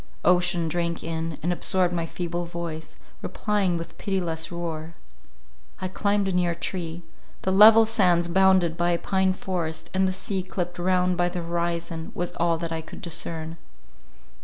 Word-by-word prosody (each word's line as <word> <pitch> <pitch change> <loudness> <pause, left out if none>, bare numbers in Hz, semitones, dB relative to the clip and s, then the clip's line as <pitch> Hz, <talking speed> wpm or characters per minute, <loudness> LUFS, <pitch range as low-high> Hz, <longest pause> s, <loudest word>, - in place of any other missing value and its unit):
Ocean 175 -2 +3
drank 170 +1 -2
in, 165 -1 -3
and 175 +2 +1
absorbed 180 0 +1
my 170 -1 -1
feeble 175 0 -3
voice, 170 -2 -6 0.3
replying 200 -5 0
with 165 - -8
pitiless 175 -5 -2
roar. 165 -1 -5 0.8
I 185 - -3
climbed 200 +1 +1
a - - 0
near 175 -2 +1
tree: 170 -1 -4 0.4
the 190 - +1
level 220 +3 +8
sands 180 -6 +3
bounded 185 -2 +4
by 175 0 +1
a - - +2
pine 190 +1 +1
forest, 165 -4 -4
and 190 0 +2
the - - 0
sea 190 +1 -3
clipped 180 -1 -4
round 180 0 +2
by 175 0 +2
the 175 -1 -4
horizon, 170 -1 -3
was 175 0 -2
all 170 0 +2
that 165 0 -4
I 165 0 -2
could 160 - -11
discern. 165 -1 -3
175 Hz, 160 wpm, -25 LUFS, 165-185 Hz, 0.8 s, level